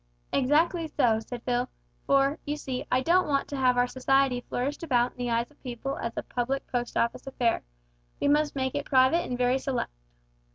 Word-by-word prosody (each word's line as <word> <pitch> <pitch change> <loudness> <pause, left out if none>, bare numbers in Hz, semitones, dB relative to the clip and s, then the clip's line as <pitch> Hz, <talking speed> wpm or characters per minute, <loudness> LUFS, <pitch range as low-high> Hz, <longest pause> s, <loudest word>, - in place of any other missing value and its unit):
"Exactly 320 +5 +2
so," 240 -7 +2
said 235 +2 -8
Phil, 245 0 0 0.4
"for, 275 +2 +3
you 295 0 -3
see, 260 -3 -4
I 255 - +3
don't 355 +6 +3
want 280 -2 +1
to 285 - -4
have 255 -2 +3
our 245 - +4
society 260 0 +2
flourished 275 +4 -2
about 250 -6 +2
in - - -24
the 245 -1 -1
eyes 235 +3 0
of 295 - -26
people 255 +2 -4
as 230 - -3
a - - -2
public 260 +3 -2
Post 245 -1 -3
Office 235 +3 0
affair. 245 -3 0 0.6
We - - +1
must 295 +1 +2
make 260 -1 -1
it 285 0 -2
private 265 +5 +4
and 250 - -3
very 250 +1 +2
select." 265 - -2
260 Hz, 200 wpm, -28 LUFS, 245-285 Hz, 0.6 s, our